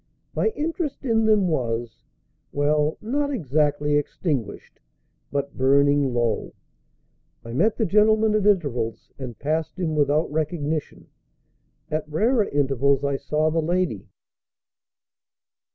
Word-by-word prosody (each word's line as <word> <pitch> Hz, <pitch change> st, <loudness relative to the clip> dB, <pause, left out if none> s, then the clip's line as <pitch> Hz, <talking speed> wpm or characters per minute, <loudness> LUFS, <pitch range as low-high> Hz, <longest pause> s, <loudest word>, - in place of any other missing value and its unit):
My -, -, +1 dB
interest 305 Hz, -2 st, -3 dB
in 225 Hz, -2 st, +2 dB
them 210 Hz, -3 st, +4 dB
was 120 Hz, -, -2 dB, 0.5 s
well, 150 Hz, +1 st, +1 dB
not 285 Hz, +6 st, -1 dB
exactly 150 Hz, -, +1 dB
extinguished, 145 Hz, -, -3 dB, 0.5 s
but 140 Hz, 0 st, -3 dB
burning 140 Hz, +1 st, +3 dB
low. 120 Hz, -2 st, -1 dB, 0.9 s
I 115 Hz, -, -7 dB
met 205 Hz, -, +2 dB
the 225 Hz, -, +1 dB
gentleman 215 Hz, +2 st, +3 dB
at 210 Hz, -1 st, +2 dB
intervals, 135 Hz, -, 0 dB
and 125 Hz, -4 st, -7 dB
passed 155 Hz, +3 st, -2 dB
him 165 Hz, -4 st, -1 dB
without 150 Hz, +1 st, +1 dB
recognition; 155 Hz, -1 st, -3 dB, 0.9 s
at 155 Hz, 0 st, -2 dB
rarer 215 Hz, -, +2 dB
intervals 140 Hz, -2 st, +1 dB
I 140 Hz, -1 st, 0 dB
saw 155 Hz, +3 st, 0 dB
the 165 Hz, +1 st, +1 dB
lady. 170 Hz, -, -1 dB
150 Hz, 115 wpm, -24 LUFS, 140-195 Hz, 0.9 s, them